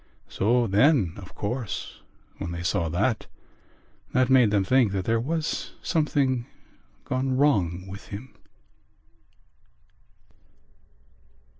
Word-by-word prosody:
So 120 +4 +2
then, 105 - +3
of 90 -2 -11
course, 105 - -4 0.4
when - - -4
they 85 0 -5
saw 85 -1 0
that, 105 +8 0 0.9
that 130 +1 +3
made 125 -4 +6
them 100 -2 +2
think 120 -1 +3
that 95 -2 -2
there 115 0 +2
was 155 +6 -2
something 140 -6 +1 0.6
gone 130 0 -1
wrong 95 - +2
with 100 +2 -9
him...." 110 +6 -8
115 Hz, 105 wpm, -26 LUFS, 95-130 Hz, 0.9 s, made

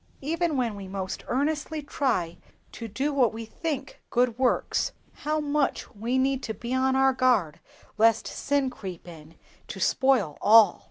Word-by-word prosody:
Even 325 +1 0
when 235 -4 -1
we 195 -1 -8
most 190 -1 -5
earnestly 300 +3 -1
try 205 - -1 0.3
to 230 - -7
do 270 +8 -2
what 255 -4 +3
we 225 0 -7
think 280 +3 -5
good 245 -1 +2
works, 255 -2 +1 0.2
how 305 +1 -2
much 295 -1 -1
we 235 +4 -2
need 265 0 +1
to 220 -3 -5
be 235 +5 -5
on 260 0 +2
our 265 0 +4
guard 245 - +2 0.4
lest 225 0 +4
sin 280 -2 -1
creep 190 -8 -8
in 160 -1 -12 0.3
to - - -7
spoil 255 - +2
all! 215 -3 +6
255 Hz, 160 wpm, -26 LUFS, 215-275 Hz, 0.4 s, all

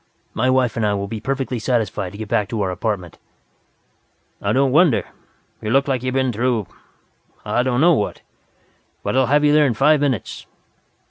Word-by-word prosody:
My 130 +3 +1
wife 130 -2 +2
and 115 - -1
I 105 -1 +1
will 100 0 -3
be 110 +2 -5
perfectly 130 +1 -3
satisfied 110 -5 -1
to - - -9
get 110 0 -6
back 105 -1 0
to 115 - -3
our 95 - -1
apartment." 90 -2 -4 1.2
"I 100 - 0
don't 135 +3 +2
wonder. 155 -2 +3 0.6
You 105 - -4
look 135 +4 +2
like 130 -3 0
you've 130 0 -3
been 130 -2 +1
through 115 -1 0 0.8
I 120 - +1
don't 125 0 0
know 175 +2 +6
what. 105 -9 -2 0.8
But - - -2
I'll 130 -1 +3
have 145 +3 +3
you 145 - +4
there 150 -1 +5
in 120 - -1
five 150 +4 +3
minutes. 130 -8 -2
125 Hz, 190 wpm, -20 LUFS, 105-135 Hz, 1.2 s, know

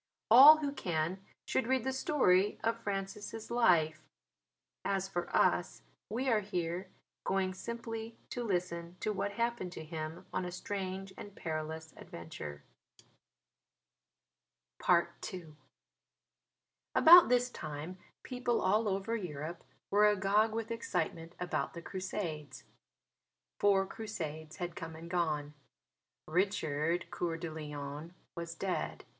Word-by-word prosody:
All 280 +6 +11
who 290 -2 -2
can 175 - -1 0.3
should 245 - 0
read 260 -2 +2
the 265 +1 -1
story 210 -9 +3
of 230 +1 0
Francis' 205 +2 -4
life: 165 -10 +3 0.8
as 195 -1 0
for 175 -2 -3
us - - +2 0.3
we 250 +5 -2
are 225 -4 +4
here 180 -2 -3 0.3
going 190 -1 0
simply 225 +2 -6
to 245 - -3
listen 175 -4 -2
to 215 - 0
what 200 +1 -2
happened 235 -5 -1
to 160 - -7
him 155 0 -6
on - - 0
a 180 - -4
strange 190 +1 -4
and 205 -1 -9
perilous 160 -1 -4
adventure. 75 -3 -8 2.3
II 170 -4 +1 1.4
About 345 +2 +10
this 250 0 +3
time 155 +3 -6 0.2
people 250 -2 -1
all 215 +3 +2
over 195 +4 -1
Europe 165 -4 -5 0.3
were 210 +1 +6
agog 210 +2 +3
with 225 +1 -3
excitement 170 -6 -2
about 180 0 -2
the 170 - -6
Crusades. 185 -6 -5 1.0
Four 195 -1 +4
Crusades 160 -8 -6
had 175 -1 -4
come 165 -1 -6
and 165 +1 -9
gone. 155 -4 0 0.7
Richard 170 -2 0
Coeur 165 -2 -2
de 165 -1 -5
Lion 150 +1 -6 0.2
was 170 -1 -6
dead. 185 +1 -3
185 Hz, 120 wpm, -33 LUFS, 165-215 Hz, 2.3 s, All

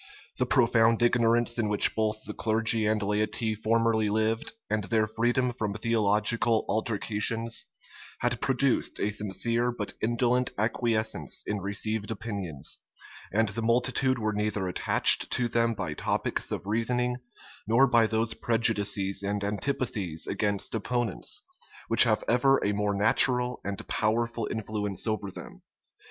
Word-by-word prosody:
The 125 - 0
profound 115 -3 +3
ignorance 120 0 +2
in 110 -2 0
which 105 - +4
both 110 0 -2
the 105 - -6
clergy 110 0 +1
and 110 0 +1
laity 110 +2 -1
formerly 110 0 +1
lived, 110 +2 -1
and 110 -1 -1
their 110 +3 +1
freedom 120 +3 0
from 105 -4 -4
theological 110 +1 +2
altercations, 110 +1 -2 0.5
had 120 -1 -1
produced 135 -1 0
a 105 - 0
sincere 115 +4 0
but 105 -4 -2
indolent 120 +2 +1
acquiescence 110 - -1
in 105 -1 -3
received 105 +2 -2
opinions; 100 - -4 0.5
and 110 +1 +1
the 105 +4 -4
multitude 125 +3 +1
were 110 -2 -2
neither 105 -2 -2
attached 90 - +4
to 125 - +1
them 115 0 0
by 80 - -4
topics - - -2
of - - -4
reasoning, 125 +3 0 0.5
nor 115 +5 +5
by 115 -3 +3
those 110 +1 0
prejudices 105 -4 +1
and 100 0 -2
antipathies 100 - -2
against 100 0 -2
opponents, 115 -1 -2 0.5
which - - +8
have - - +1
ever 135 +3 +3
a 100 - +1
more 105 0 -1
natural 125 +4 +2
and 100 -1 -6
powerful 115 +1 -1
influence 105 -2 -3
over 110 -3 -2
them. - - -11
110 Hz, 135 wpm, -27 LUFS, 105-120 Hz, 0.5 s, which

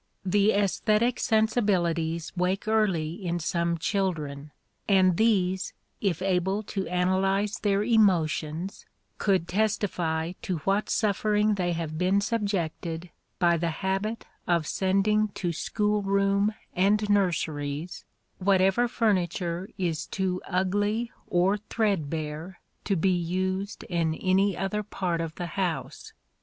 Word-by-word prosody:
The 200 +2 +3
æsthetic 215 +4 +2
sensibilities 180 -8 +1
wake 185 +3 0
early 190 -6 +1
in 175 -1 -1
some 170 0 0
children, 155 -6 -2 0.4
and 185 -2 +5
these, 190 -3 +1 0.3
if 185 -4 0
able 190 +2 +1
to 195 -2 -2
analyze 195 +4 +1
their 200 -1 +1
emotions, 180 -5 +1 0.3
could 190 -4 +2
testify 175 -5 0
to 180 - -2
what 200 +2 +1
suffering 210 0 +2
they 180 -3 0
have 160 -2 -4
been 185 +2 +3
subjected 180 -6 -2 0.3
by 170 -2 +3
the 170 +1 0
habit 195 +7 -2 0.2
of 170 -3 +2
sending 200 +5 +2
to 175 - -1
school 210 +5 0
room 200 +1 +2 0.2
and 205 +3 +3
nurseries 165 -5 -1 0.4
whatever 195 +4 +3
furniture 185 -5 0
is 170 -4 -2
too 185 -2 -2
ugly 205 +5 0 0.2
or 185 +4 +2
threadbare 165 -4 -2 0.3
to 200 - +1
be 185 +2 +2
used 185 +3 -2
in 165 -3 -1
any 190 +1 +2
other 195 +3 -1
part 180 -5 -2
of 165 -1 -5
the 175 - -4 0.2
house. 175 -3 -3
190 Hz, 120 wpm, -27 LUFS, 170-205 Hz, 0.4 s, and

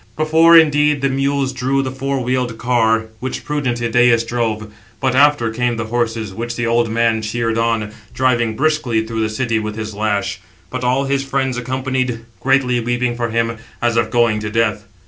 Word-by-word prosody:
Before, 160 +2 +6
indeed, 150 -2 +4
the 135 - +1
mules 135 0 0
drew 135 +2 0
the 130 - -3
four 135 0 -2
wheeled 125 -2 -1
car, 115 -2 +1
which 130 +2 -5
prudent 140 -5 -1
Idæus 120 0 +3
drove; 110 -3 -2 0.3
but 130 0 0
after 140 -4 +3
[came] 120 +1 -1
the 115 - -2
horses, 115 -4 -1
which 115 +3 -4
the 120 - -2
old 115 0 +1
man 115 0 +1
cheered 115 +1 -2
on, 115 -2 0 0.2
driving 120 -3 +1
briskly 130 -6 0
through 110 0 -3
the 110 - 0
city 115 0 -1
with 105 -1 -4
his 110 -1 -5
lash; 100 -2 -1 0.3
but 130 -1 -4
all 130 +2 +1
his 135 0 0
friends 135 -1 -1
accompanied, 130 -1 -2 0.2
greatly 130 -2 +2
weeping 120 +1 -1
for 120 -1 -2
him, 115 0 -1 0.2
as 120 -1 0
if 115 - +1
going 115 -3 +2
to 105 0 -4
death. 105 -1 0
120 Hz, 185 wpm, -18 LUFS, 115-130 Hz, 0.3 s, Before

